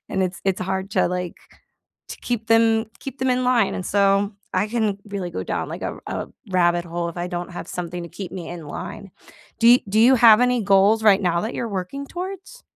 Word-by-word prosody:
And 190 - -1
it's 185 0 -3
it's 195 -1 0
hard 190 +1 -3
to, - - +2
like 180 -1 -3 0.7
to - - -7
keep 235 -3 -3
them 225 0 +4
keep 270 -1 -8
them 260 0 +1
in 250 0 +1
line, 245 -5 +2
and, 185 - -4
so, 200 +1 +2 0.2
I 195 +3 +1
can 215 -3 0
really 200 -3 -4
go - - -4
down, - - -3
like, - - -7
a - - -2 0.2
r - - -3
a - - -19 0.2
rabbit 175 -1 +2
hole 170 0 -3
if 170 - -14
I 175 - -2
don't 175 +1 -5
have 175 - -7
something 175 0 -5
to - - -8
keep 185 -4 -7
me 180 -3 -6
in 170 -3 -8
line. 195 +6 -7 0.5
Do 230 - +6
you 245 +1 +8
do 215 +3 +2
you 250 +4 +7
have 225 -1 +7
any 250 -1 +2
goals 200 +2 +4
right 205 -2 +6
now 170 -2 +1
that 220 +3 -3
you're 235 - -3
working 200 +8 -5
towards? 385 - -7
200 Hz, 230 wpm, -22 LUFS, 180-230 Hz, 0.7 s, you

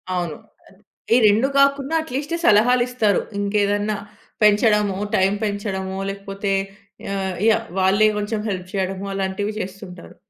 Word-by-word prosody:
అవును. 175 -4 -2 0.3
అద్ 190 - -21 0.4
ఈ - - +6
రెండు 220 +6 +3
కాకుండా 275 +2 +2
ఎట్లీస్ట్ 290 +3 -4
సలహాలు 240 +4 +5
ఇస్తారు. 225 -5 +1 0.2
ఇంకేదన్నా 205 +1 0 0.5
పెంచడము, 210 -2 +3 0.2
టైమ్ 190 +2 +2
పెంచడమో 195 -2 -3
లేకపోతే 195 0 -5 0.6
ఆహ్, 190 -2 -2
యాహ్! 225 0 +3
వాళ్ళే 195 +3 +4
కొంచెం 210 +1 -2
హెల్ప్ 185 -2 -4
చేయడము 190 0 -2
అలాంటివి 195 +2 -2
చేస్తుంటారు. 185 -2 -8
205 Hz, 120 wpm, -21 LUFS, 190-215 Hz, 0.6 s, ఈ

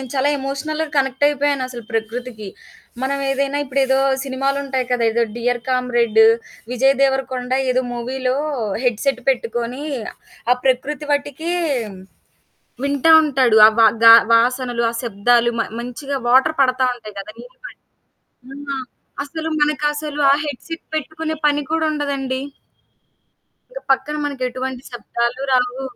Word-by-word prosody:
నేను 260 -2 -8
చాలా 270 +2 +2
ఎమోషనల్‌గా 300 +4 -3
కనెక్టయిపోయాను 280 +1 +1
అసలు 240 -2 -8
ప్రకృతికి. 225 -1 -4 0.5
మనం 275 +1 -1
ఏదైనా 275 +1 -1
ఇప్పుడు 275 0 -1
ఏదో 265 0 +2 0.3
సినిమాలుంటాయి 270 0 -1
కదా! 245 -1 +1
ఏదో 235 +1 +1
'డియర్ 240 0 -1
కామ్రేడ్డు' 240 -3 +3 0.4
విజయ్ 265 +2 +3
దేవరకొండ 265 -2 0 0.2
ఏదో 255 0 +2
మూవీలో 255 +2 -2 0.5
హెడ్‌సేట్ 245 +2 0
పెట్టుకొని, 240 +1 -1 0.7
ఆ - - +7
ప్రకృతి 270 +3 0
వట్టికీ 290 +3 -2 1.3
వింటా 280 +3 +2
ఉంటాడు. 260 -6 +2
ఆ - - +8
వా 225 - +8 0.2
గా 230 - +11 0.2
వాసనలు, 245 +1 +1
ఆ - - -7
శబ్దాలు, 235 +2 +2
మ - - +2 0.2
మంచిగా 270 +4 -5
వాటరు 260 +5 +4
పడతా 260 0 +2
ఉంటాయి 215 -4 -12
గదా! 200 +2 -8
నీళ్ళు - - -15
పడి. - - -14 0.9
ఆ! - - -4 0.5
అసలు 320 +3 -5
మనకసలు 295 0 -1
ఆ - - +6
హెడ్‌సేట్ 295 +4 -7
పెట్టుకునే 315 +1 -4
పని 295 0 +2
కూడా 325 0 +1
ఉండదండి. 275 -3 -2 1.3
ఇంక - - -7
పక్కన 295 +3 -3
మనకెటువంటి 260 -2 -4
శబ్దాలు 235 +2 -3
రావు. 250 +1 +1
260 Hz, 125 wpm, -19 LUFS, 245-285 Hz, 1.3 s, గా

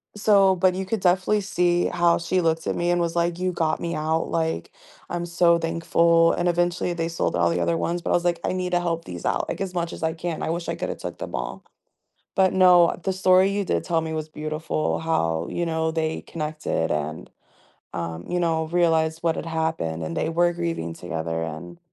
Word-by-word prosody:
so 200 -2 +4
but 185 +1 +3
you 190 0 -3
could 220 +2 -2
definitely 185 +3 +3
see 175 -2 +1
how 170 -1 +3
she 180 +2 0
looked 165 -1 0
at - - 0
me 175 0 0
and 175 0 +2
was 170 0 -1
like, 170 0 0
"You 185 0 0
got 160 -2 0
me 170 -1 -3
out. 160 +1 -1
Like, 160 - -1 0.4
I'm 175 0 -3
so 170 0 +3
thankful." 165 0 +3
And, 175 0 +1
eventually, 175 +1 0
they 165 -1 -2
sold 165 - -1
all 85 0 +3
the 85 +1 0
other 85 -1 +1
ones, 175 +1 -1
but - - -4
I - - +3
was 175 - +1
like, 175 -1 +1
I - - 0
need 180 -1 -2
to 175 0 +2
help 165 -1 -2
these 90 -1 -7
out, - - 0
like, - - -4
much 170 -1 -2
as - - -8
I 160 0 +1
can. 165 0 -4
I - - -2
wish 170 0 -3
I - - -1
coulda - - -3
took - - -7
them - - -6
all. - - -5 0.7
But, 190 -1 +3
no, 180 -2 +6
the 190 - 0
story 185 0 +4
you 200 0 0
did - - 0
tell 165 -2 0
me 160 0 -4
was 155 0 -4
beautiful, 155 0 -2
how, 80 - 0
you 175 - -2
know, 160 -1 0
they 160 0 -2
connected 155 -1 -3
and, 75 +1 -3 0.7
um, 85 0 -4
you 180 0 0
know, 160 -2 +1
realized 160 -2 +2
what 165 - +2
had - - -5
happened, 160 - -2
and 80 +1 -5
they - - 0
were 175 +1 +2
grieving 165 - -3
together, 80 -1 -4
and, 80 +2 -7
165 Hz, 220 wpm, -24 LUFS, 155-175 Hz, 0.7 s, no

